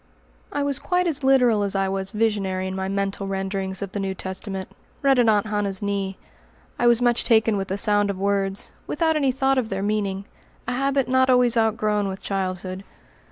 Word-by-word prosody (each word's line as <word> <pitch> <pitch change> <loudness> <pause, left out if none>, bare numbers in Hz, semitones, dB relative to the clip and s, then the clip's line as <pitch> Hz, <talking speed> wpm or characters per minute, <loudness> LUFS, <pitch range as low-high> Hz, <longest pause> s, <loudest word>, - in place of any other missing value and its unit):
I 285 - -1
was 280 -2 -1
quite 360 0 0
as 300 -5 -1
literal 250 -5 +4
as 200 -1 -1
I 195 0 +1
was 190 0 -3
visionary 200 -4 -1
in 190 0 -4
my 190 0 -2
mental 195 0 -2
renderings 195 0 -3
of 195 - -6
the 205 - -4
New 195 -1 -2
Testament, 190 +1 -5 0.3
read 270 -2 +4
at 235 -2 +4
Aunt 210 -1 +3
Hannah's 205 -2 -2
knee. 195 -1 -2 0.6
I - - +3
was 240 0 +4
much 240 -1 +3
taken 220 -2 +3
with 195 -1 -2
the 195 - -2
sound 205 0 +4
of 200 - -3
words, 195 0 -1 0.2
without 320 +1 +1
any 275 -3 +2
thought 270 +1 +1
of 230 -3 -3
their 195 0 -3
meaning 200 -2 -1 0.4
a - - -1
habit 275 0 0
not 260 0 +3
always 250 -2 +4
outgrown 215 -2 +1
with 190 0 -5
childhood. 185 -1 -4
205 Hz, 200 wpm, -23 LUFS, 195-245 Hz, 0.6 s, literal